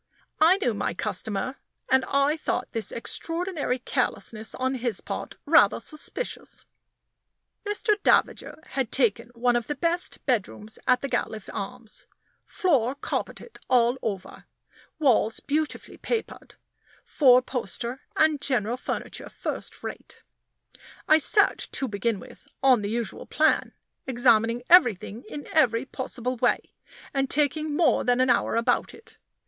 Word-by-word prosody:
I 335 +5 +6
knew 245 - 0
my 200 - -2
customer, 210 +8 -3 0.3
and 265 0 +3
I 280 +2 +2
thought 315 - -3
this 225 -1 -2
extraordinary 330 +2 -2
carelessness 220 -3 -2
on 260 +1 -1
his 240 -5 -2
part - - -6
rather - - +5
suspicious. 310 +10 -4 1.0
Mr. 415 0 0
Davager 315 - +1
had 265 -4 -2
taken 235 -2 +1
one 245 +1 +2
of 240 -1 -1
the 295 - -2
best 335 +5 -2
bedrooms 220 -3 -2
at 250 0 +4
the - - 0
Gatliffe 220 -5 -3
Arms. 225 +2 -7 0.4
Floor 275 - +1
carpeted 465 - -5
all 245 +1 +3
over, 195 -4 -5 0.5
walls 235 -6 +2
beautifully 305 +1 -3
papered, 460 -2 -4 0.5
four 255 -4 +5
poster, 245 +1 -4
and 310 -2 +3
general 245 -4 0
furniture - - -5
first - - -6
rate. - - -8 0.8
I 310 +1 +6
searched, - - +2
to 270 - 0
begin 215 0 -1
with, - - -14 0.2
on 255 -4 +5
the 205 - -3
usual 230 -2 -4
plan, 315 0 +2 0.4
examining 235 -2 +3
everything 240 - +4
in 290 - -7
every 250 -5 +3
possible 255 -2 -4
way, - - 0 0.4
and 270 -1 0
taking 300 +1 +1
more 295 -7 +3
than 245 0 +2
an 255 0 +4
hour 240 - +1
about 230 0 +1
it. 450 - -18
255 Hz, 130 wpm, -26 LUFS, 230-295 Hz, 1.0 s, I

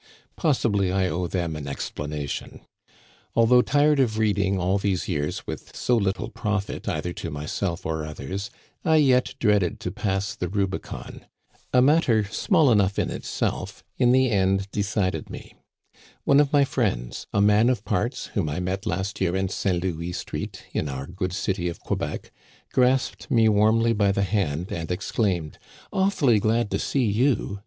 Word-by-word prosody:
Possibly 110 - +1
I 95 0 +1
owe 90 +2 -2
them 85 -3 -2
an 75 -2 -6
explanation. 75 +1 -5 0.7
Although 115 +2 +6
tired 145 +3 +3
of 115 -5 +2
reading 100 -3 +1
all 95 +2 +1
these 95 -3 -1
years 75 -5 -2
with - - -7
so 125 - +1
little 100 -4 -1
profit 105 -2 -3
either 90 - -2
to 85 - -5
myself 80 +4 -3
or 80 -1 -2
others, 95 +7 -5 0.3
I 160 - +3
yet 130 -4 +3
dreaded 105 -6 +2
to 90 - -3
pass 95 0 -2
the 90 - -3
Rubicon. 95 -1 -4 0.4
A 125 0 +5
matter 135 -7 +4
small 150 - +2
enough 100 -3 +2
in - - 0
itself - - -3 0.2
in 120 - +5
the 130 -1 +4
end 95 0 +1
decided 100 -2 -1
me. - - -9 0.7
One 140 - +5
of 145 -1 +3
my 145 -2 +5
friends, 100 - -2
a - - +1
man 105 +3 +5
of 120 -5 -1
parts, 90 -4 -1
whom 75 - 0
I 75 - -3
met 95 +2 -3
last 95 +3 -2
year 90 -1 +1
in 95 0 0
St. 90 -2 -1
Louis 85 -1 -3
Street, - - -5
in 75 - -1
our 65 0 -4
good 90 +2 -4
city 90 -1 -1
of 85 - -7
Quebec, - - -4 0.4
grasped 130 +3 +1
me 115 -5 +4
warmly 110 +2 +4
by 100 -2 +2
the 100 0 0
hand 90 -4 -1
and 85 -1 -4
exclaimed: 90 -3 -1 0.3
"Awfully 180 - +3
glad 110 +1 +1
to - - 0
see 135 - 0
you 110 -1 +1
100 Hz, 165 wpm, -25 LUFS, 90-115 Hz, 0.7 s, Although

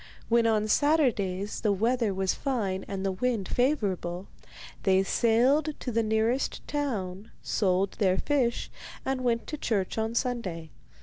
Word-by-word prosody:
When 235 0 +4
on 215 -1 +2
Saturdays 215 - +1
the 210 - +2
weather 225 +2 +1
was 190 0 0
fine 205 -9 -2
and 195 -1 -4
the 195 - +1
wind 215 0 -1
favourable, 195 - 0 0.6
they 190 -1 +3
sailed 260 +9 +2
to 250 - -4
the 230 0 +2
nearest 220 +4 0
town, 215 -9 -3
sold 190 -1 +1
their 190 -2 +3
fish, 260 -5 0 0.3
and 265 -1 -1
went 235 -2 +1
to 305 - -6
church 210 -4 -1
on 220 +1 -2
Sunday. 190 -11 -2
220 Hz, 140 wpm, -28 LUFS, 190-250 Hz, 0.6 s, When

